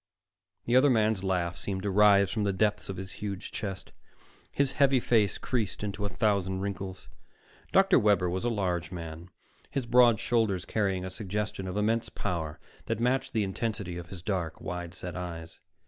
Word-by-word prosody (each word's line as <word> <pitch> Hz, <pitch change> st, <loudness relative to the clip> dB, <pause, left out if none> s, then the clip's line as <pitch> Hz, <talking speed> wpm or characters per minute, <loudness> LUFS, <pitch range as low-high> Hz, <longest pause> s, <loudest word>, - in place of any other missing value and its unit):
The 120 Hz, -, +2 dB
other 135 Hz, +3 st, +6 dB
man's 110 Hz, -5 st, +2 dB
laugh 90 Hz, -3 st, 0 dB
seemed 95 Hz, -2 st, -4 dB
to 100 Hz, -, 0 dB
rise 100 Hz, -1 st, +5 dB
from 110 Hz, -2 st, -1 dB
the 100 Hz, -, +2 dB
depths 105 Hz, +1 st, 0 dB
of 95 Hz, -, -4 dB
his 95 Hz, 0 st, -6 dB
huge 100 Hz, -3 st, -4 dB
chest. 95 Hz, -2 st, -5 dB, 0.6 s
His 140 Hz, -1 st, +1 dB
heavy 135 Hz, -1 st, +4 dB
face 110 Hz, -4 st, +2 dB
creased 110 Hz, -6 st, -2 dB
into 105 Hz, 0 st, -3 dB
a -, -, -1 dB
thousand 100 Hz, -4 st, 0 dB
wrinkles. 95 Hz, -2 st, -5 dB, 0.6 s
Dr. -, -, +5 dB
Webber 100 Hz, -4 st, +3 dB
was 90 Hz, +1 st, -2 dB
a 120 Hz, -, +1 dB
large 90 Hz, -6 st, -1 dB
man, 85 Hz, -1 st, -7 dB, 0.4 s
his 135 Hz, -3 st, -2 dB
broad 120 Hz, -2 st, +5 dB
shoulders 110 Hz, -7 st, +1 dB
carrying 95 Hz, -4 st, 0 dB
a 95 Hz, -, -5 dB
suggestion 100 Hz, -1 st, -3 dB
of 95 Hz, +2 st, -4 dB
immense 110 Hz, +2 st, +1 dB
power 80 Hz, -4 st, -3 dB, 0.3 s
that -, -, -1 dB
matched 125 Hz, +3 st, 0 dB
the 110 Hz, -, +2 dB
intensity 95 Hz, -3 st, -3 dB
of 85 Hz, 0 st, -10 dB
his 90 Hz, -3 st, -9 dB
dark, 90 Hz, -5 st, -2 dB
wide 90 Hz, -1 st, -5 dB
set 90 Hz, -1 st, -6 dB
eyes. 85 Hz, -2 st, -6 dB
100 Hz, 180 wpm, -29 LUFS, 90-110 Hz, 0.6 s, other